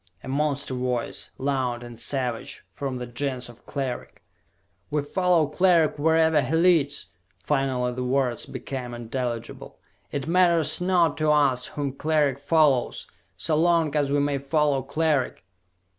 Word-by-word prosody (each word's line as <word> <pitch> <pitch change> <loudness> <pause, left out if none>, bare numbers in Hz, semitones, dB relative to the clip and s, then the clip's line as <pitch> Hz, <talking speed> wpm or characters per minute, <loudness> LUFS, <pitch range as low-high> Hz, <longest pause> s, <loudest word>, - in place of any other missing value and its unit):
A - - -9
monster 140 0 -1
voice, 125 -2 -2
loud 130 -3 -1
and 120 -1 -10
savage, 125 -4 -3
from 135 -2 -4
the 125 - -5
Gens 125 0 -3
of 120 0 -16
Cleric. 135 -3 -5 0.7
"We 150 -1 0
follow 180 +1 +2
Cleric 170 -2 +2
wherever 160 0 +4
he 160 - -1
leads!" 155 - +2 0.3
Finally 130 -4 0
the 125 +1 -3
words 125 -2 0
became 125 -3 -6
intelligible. 120 0 -5 0.3
"It 140 - -3
matters 170 -2 +3
not 175 -4 +2
to 155 0 +2
us 140 -4 +3
whom 145 -2 -3
Cleric 145 -2 +1
follows, 145 -4 +2 0.3
so 155 - 0
long 165 -2 +2
as 145 -2 +1
we 145 - +2
may 140 -1 0
follow 140 0 +1
Cleric!" 150 - -1
140 Hz, 140 wpm, -25 LUFS, 125-155 Hz, 0.7 s, wherever